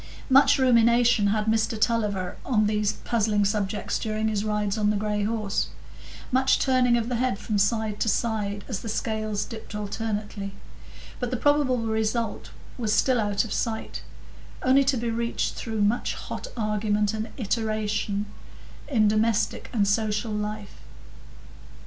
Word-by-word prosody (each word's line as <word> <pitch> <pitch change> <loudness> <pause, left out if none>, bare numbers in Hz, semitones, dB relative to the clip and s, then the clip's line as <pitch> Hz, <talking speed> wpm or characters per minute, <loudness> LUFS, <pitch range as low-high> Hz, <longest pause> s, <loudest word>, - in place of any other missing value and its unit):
Much 275 +1 +6
rumination 235 -3 +4
had 210 +1 +1
Mr 220 0 +1
Tulliver 210 -5 0
on 215 -5 +2
these 210 -1 +1
puzzling 210 -3 0
subjects 205 0 -1
during 215 0 -1
his 210 -1 -1
rides 210 -1 -1
on 210 -2 +1
the 210 - +1
gray 210 0 -1
horse; 215 -2 -1 0.6
much 260 +1 +3
turning 255 -2 +3
of 230 -1 -1
the 245 -1 -1
head 250 -3 0
from 210 0 -2
side 215 0 0
to 225 - +1
side, 205 -2 -1
as 225 -7 -3
the 225 - -6
scales 215 -1 -2
dipped 220 -2 -9
alternately; 210 -1 -4 0.7
but 245 - -2
the 255 - -1
probable 290 -1 +2
result 225 0 -1 0.3
was 220 -3 0
still 245 +3 +3
out 205 0 +1
of 220 - -4
sight, 225 -2 -3 0.6
only 265 +2 +5
to 270 -1 +1
be 235 0 -2
reached 235 +1 -1
through 220 -3 -2
much 210 +4 +1
hot - - -6
argument 210 -1 0
and 220 0 -3
iteration 215 -3 -1 0.6
in 220 -7 +3
domestic 215 +1 +1
and 205 -5 +1
social 215 +2 0
life. 210 -1 -4
220 Hz, 150 wpm, -26 LUFS, 210-235 Hz, 0.7 s, Much